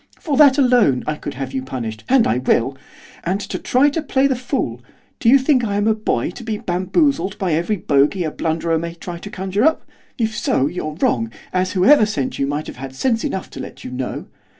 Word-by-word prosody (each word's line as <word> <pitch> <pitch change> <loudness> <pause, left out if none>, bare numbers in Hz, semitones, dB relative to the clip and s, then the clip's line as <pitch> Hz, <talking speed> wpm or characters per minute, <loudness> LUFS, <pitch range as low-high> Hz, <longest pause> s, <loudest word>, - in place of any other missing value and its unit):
For 295 -4 -2
that 280 -2 +7
alone 245 - +3
I 155 - -1
could 145 -1 -7
have 135 0 -5
you 130 - -1
punished, 115 -4 -5
and 260 -3 +5
I 120 - +1
will! 130 +1 +1 0.5
and 190 +4 -2 0.2
try 275 +4 +3
to 325 - -2
play 275 -2 +1
the 270 -2 +2
fool? 245 - -3 0.4
Do 230 - +3
you 270 - +8
think 260 -1 +2
I 205 -3 -1
am 205 +1 +1
a 220 - +4
boy 215 - -1
to 235 - -10
be 220 -2 -3
bamboozled 205 - 0
by 185 -4 -1
every 170 +7 0
bogey 150 +3 +2
a 155 - -2
blunderer 165 +1 -1
may 170 +1 -5
try 170 0 -7
to 205 - -8
conjure 195 +2 -2
up? 315 +2 +2 0.3
If 220 -3 -1
so, 130 - +1
you're 155 -1 -4
wrong, 115 -1 +1 0.2
as 185 0 0
whoever 215 +5 +5
sent 140 -12 -3
you 140 - +1
might 145 +2 -2
have - - -9
had 135 +1 -8
sense 230 - 0
enough 190 - -3
to - - -9
let - - -9
you 125 - -7
know. 125 0 -4
185 Hz, 220 wpm, -20 LUFS, -, 0.5 s, you